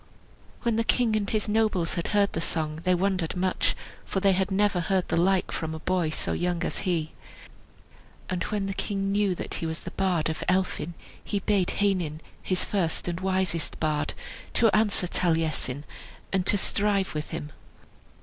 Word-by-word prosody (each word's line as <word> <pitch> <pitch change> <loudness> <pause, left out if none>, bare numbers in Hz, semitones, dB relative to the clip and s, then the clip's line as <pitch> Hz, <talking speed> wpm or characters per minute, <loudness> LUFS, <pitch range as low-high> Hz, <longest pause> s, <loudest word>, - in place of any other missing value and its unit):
When 235 -2 +1
the 230 - +2
king 225 -1 +2
and 205 -2 0
his 215 -1 0
nobles 210 -6 +1
had 170 - -2
heard 205 -1 +2
the 165 - -1
song, 155 -1 -1
they 185 0 +4
wondered 185 -2 0
much, 185 0 +1 0.3
for 195 - -2
they 195 0 +4
had 190 +1 +1
never 200 -1 +2
heard 185 +1 +1
the - - +1
like 185 +2 +2
from 160 0 -3
a - - -6
boy 180 -1 +1
so 155 - -1
young 175 -1 -1
as - - -2
he. 160 -3 0 1.2
And 180 -1 -2
when 205 -2 -1
the 195 - -2
king 195 0 -1
knew 200 -2 +2
that - - -5
he 165 - -2
was 160 0 -4
the - - -7
bard 180 -5 +1
of 160 -1 -3
Elphin 180 -3 0 0.3
he 205 - -2
bade 200 -2 +1
Heinin, 180 -7 +1 0.2
his 185 -1 0
first 180 -6 0
and 170 0 -2
wisest 185 -3 0
bard, 150 -1 0 0.4
to 225 -4 +4
answer 210 -4 +3
Taliesin, 160 -6 0 0.5
and 190 -1 +1
to 205 - +4
strive 200 -1 +1
with 150 0 -4
him. 150 -2 -5
185 Hz, 180 wpm, -27 LUFS, 165-200 Hz, 1.2 s, they